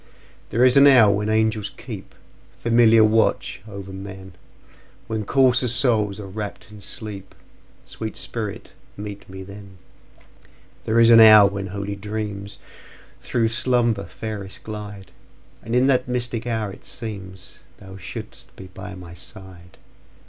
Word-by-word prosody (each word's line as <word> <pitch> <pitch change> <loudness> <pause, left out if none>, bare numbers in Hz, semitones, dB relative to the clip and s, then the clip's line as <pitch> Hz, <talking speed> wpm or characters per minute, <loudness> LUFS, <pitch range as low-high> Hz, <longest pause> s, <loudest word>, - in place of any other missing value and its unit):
There 120 +3 +3
is 130 +1 +5
an 140 +1 +8
hour 115 -7 +7
when 105 +1 -1
angels 110 -1 0
keepFamiliar 115 -1 +1
watch 110 +1 +1
o'er 100 -1 -8
men, 95 -1 -9 0.7
When 110 -2 -4
coarser 130 +1 +3
souls 110 -4 +2
are 105 - -7
wrapp'd 105 +1 -7
in 105 -1 -12
sleep—Sweet 105 +1 -8
spirit, 115 -6 -5 0.2
meet 100 -1 -8
me 95 0 -8
then! 100 0 -12 1.1
There 110 +1 +2
is 115 0 +6
an 115 - +9
hour 110 -2 +9
when 100 0 -4
holy 100 +1 -5
dreamsThrough 105 +2 -5
slumber 120 -3 +1
fairest 105 -3 -8
glide; 105 -2 -8 0.5
And 115 - -4
in 125 +1 +4
that 135 -2 +2
mystic 120 -1 -3
hour 110 -4 -2
it - - -13
seemsThou 95 -2 -8
shouldst - - -10
be 95 - -11
by 100 0 -8
my 90 -2 -11
side. 90 -1 -10
105 Hz, 125 wpm, -22 LUFS, 100-115 Hz, 1.1 s, an